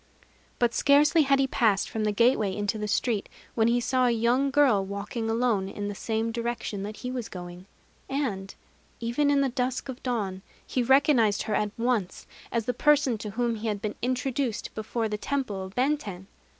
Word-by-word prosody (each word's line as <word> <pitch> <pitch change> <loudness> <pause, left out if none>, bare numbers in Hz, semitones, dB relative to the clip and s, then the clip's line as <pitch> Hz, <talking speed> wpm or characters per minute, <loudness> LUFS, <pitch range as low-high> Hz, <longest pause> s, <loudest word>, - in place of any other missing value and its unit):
But 240 -1 +2
scarcely 295 +5 +5
had 275 -1 +3
he 270 - +3
passed 220 -6 +2
from 220 -1 -2
the 210 - +2
gateway 215 -3 +2
into 205 +1 -2
the 210 - -2
street, 210 0 0 0.2
when 225 -1 +2
he 240 +1 +3
saw 255 +1 +2
a - - +4
young 240 +4 +2
girl 270 -8 +4
walking 200 +4 -4
alone 225 -4 +1
in 205 +1 -4
the - - -3
same 225 +2 -2
direction 235 -3 -3
that 210 +2 -5
he 250 - -5
was 245 -3 -4
going; 180 0 -9 0.4
and, 215 -9 -3 0.4
even 240 +5 +1
in 285 -1 +3
the 275 - +2
dusk 255 +2 -2
of 255 - -5
the - - -27
dawn, 205 -7 -2 0.2
he 255 - -1
recognized 250 -4 +4
her 215 - -3
at 210 0 +1
once 230 -6 -1 0.3
as 230 -2 -1
the 250 - 0
person 275 -3 +3
to 210 - -5
whom 235 +2 -1
he 220 +2 -4
had 210 -2 -1
been 210 +1 -3
introduced 255 -1 -2
before 220 +1 -2
the 210 -1 -4
temple 240 -7 -2
of 190 +1 -9
Benten. 250 -9 -1
230 Hz, 195 wpm, -27 LUFS, 210-255 Hz, 0.4 s, scarcely